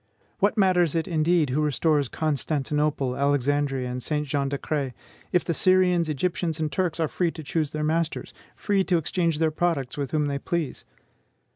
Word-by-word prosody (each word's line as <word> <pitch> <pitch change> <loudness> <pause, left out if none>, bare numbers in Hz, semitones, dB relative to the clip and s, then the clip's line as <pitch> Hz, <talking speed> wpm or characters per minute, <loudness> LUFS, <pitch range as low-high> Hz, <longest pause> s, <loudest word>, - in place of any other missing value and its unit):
What 205 +2 +2
matters 180 -5 +3
it, 165 -1 0
indeed, 160 -3 +2
who 145 +4 +1
restores 150 -1 +2
Constantinople, 150 -2 -1
Alexandria, 140 -1 +1
and 125 0 -4
Saint 150 +2 -1
Jean 140 -1 0
d'Acre, 140 -2 -2 0.4
if 180 - +2
the 170 - 0
Syrians, 180 -1 +3
Egyptians, 165 +1 -1
and 155 -2 -1
Turks 170 +2 -1
are 160 - +2
free 175 +3 0
to 160 -1 -8
choose 155 0 -1
their 155 +1 -3
masters; 160 +1 -1 0.2
free 200 -2 +1
to 180 - +2
exchange 165 0 0
their 160 0 +2
products 155 -6 -1
with 140 -2 -2
whom 150 -1 +1
they 140 -1 -2
please? 170 -2 -3
155 Hz, 170 wpm, -25 LUFS, 145-170 Hz, 0.4 s, matters